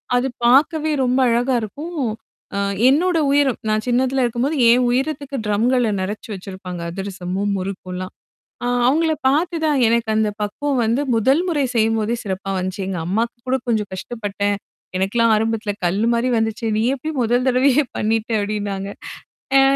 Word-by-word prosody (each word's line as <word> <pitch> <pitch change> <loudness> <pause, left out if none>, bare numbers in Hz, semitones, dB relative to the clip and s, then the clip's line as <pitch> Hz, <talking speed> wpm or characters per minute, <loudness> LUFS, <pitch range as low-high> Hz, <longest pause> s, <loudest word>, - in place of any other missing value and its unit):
அது 245 +2 +2 0.2
பாக்கவே 305 +5 +4
ரொம்ப 255 +1 +2
அழகா 245 +3 +2
இருக்கும். 300 - -6 0.6
அ 200 - 0 0.3
என்னோட 340 +5 +3
உயிரம். 280 -3 +2
நான் 215 0 0
சின்னதல 255 +1 +2
இருக்கும்போது 245 +6 -1
என் 250 +1 +4
உயிரத்துக்கு 280 +2 -2
ட்ரம்கள 230 +3 +2
நிறச்சு 205 +4 -5
வச்சிருப்பாங்க. 185 -2 -7
அதிரசமும், 190 +1 -3
முறுக்கும்லாம். 185 -1 -5 0.5
ஆ - - 0 0.2
அவுங்கள 320 +5 +3 0.2
பாத்து 335 +5 +1
தான் 295 -3 +2
எனக்கு 230 0 +1
அந்த 220 -1 +2
பக்குவம் 270 +6 -1
வந்து 235 +6 +1
முதல் 265 +9 +3
முறை 295 -5 +1
செய்யும்போதே 225 0 +1
சிறப்பா 195 0 -4
வந்துச்சு. 185 +1 -3
எங்க 185 -3 -3
அம்மாக்கு 225 +6 -1
கூட, 260 - +3
"கொஞ்சம் 215 -3 0
கஷ்டப்பட்டேன். 205 0 -2 0.4
எனக்குெல்லாம் 225 +4 +2
ஆரம்பத்தல 220 -1 -1
கல்லு 200 +6 +1
மாரி 235 +2 +1
வந்துச்சு. 225 +1 -1
நீ - - +1
எப்டி 310 +4 -5
முதல் 245 +2 +1
தடவையே 265 +3 +3
பண்ணிட்ட?" 220 +1 0
அப்படின்னாங்க. 200 -1 -3 0.7
ஆ. - - +7
230 Hz, 145 wpm, -20 LUFS, 205-265 Hz, 0.7 s, ஆ